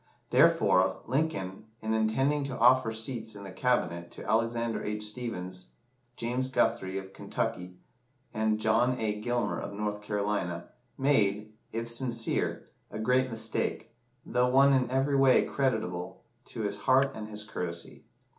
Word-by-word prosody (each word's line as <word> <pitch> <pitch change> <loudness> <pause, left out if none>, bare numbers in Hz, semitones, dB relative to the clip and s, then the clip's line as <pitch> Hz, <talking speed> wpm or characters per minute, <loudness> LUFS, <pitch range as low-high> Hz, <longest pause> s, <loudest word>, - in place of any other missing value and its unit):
Therefore, - - +4
Lincoln, 115 -9 -2
in 110 0 -2
intending 135 +7 +1
to 130 -2 -4
offer 125 -1 +5
seats 110 0 -4
in 100 - -9
the 100 - -8
Cabinet 90 -6 0
to - - -10
Alexander 115 +1 0
H. 105 0 -3
Stephens, 95 -5 -5 0.5
James 125 +2 -1
Guthrie, 115 -7 0
of 95 0 -7
Kentucky, 90 -1 -4 0.6
and 110 0 +1
John 115 +3 +2
A. 105 -1 -1
Gilmer, 120 -2 0
of 100 - -6
North 105 0 -3
Carolina, 100 -4 -2 0.3
made 110 -6 +2 0.2
if 115 +1 -3
sincere 115 -1 -1 0.2
a - - -7
great 125 +4 +2
mistake, 115 -2 -2 0.3
though 125 0 +2
one 135 +2 +6
in 130 -2 +2
every 135 +2 +1
way 135 -1 +5
creditable 110 -10 -2 0.2
to - - -6
his 100 -1 -2
heart 135 +5 +3
and 110 -1 -6
his 105 -1 -4
courtesy. 85 -5 -6
110 Hz, 140 wpm, -29 LUFS, 105-125 Hz, 0.6 s, one